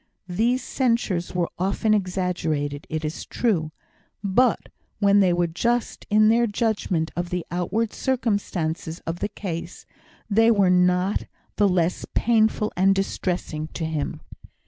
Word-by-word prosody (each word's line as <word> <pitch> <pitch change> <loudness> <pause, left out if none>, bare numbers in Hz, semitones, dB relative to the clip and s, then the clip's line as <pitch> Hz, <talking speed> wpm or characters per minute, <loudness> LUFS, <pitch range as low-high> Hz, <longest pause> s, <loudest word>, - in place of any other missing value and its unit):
These 235 +8 +1
censures 230 -11 0
were 175 -2 0
often 200 +4 +1
exaggerated, 175 -7 -1
it 155 -1 -3
is 155 - -4
true; 170 -10 0 0.5
but 220 +5 +2 0.3
when 200 -1 +4
they 190 -3 +4
were 175 0 +2
just 235 +8 -1
in 215 0 +5
their 235 +1 +4
judgment 205 -7 -1
of 175 0 -3
the 180 -2 -3
outward 205 +6 -1
circumstances 195 - -1
of 165 +1 -3
the - - -2
case, 175 -4 -6 0.4
they 225 +2 +4
were 200 -5 +4
not 180 +2 +2 0.3
the 205 -1 +4
less 180 -1 0
painful 220 -2 +2
and 195 +2 +4
distressing 175 -5 -2
to 165 - -2
him. 155 -2 -3
190 Hz, 135 wpm, -24 LUFS, 170-220 Hz, 0.5 s, in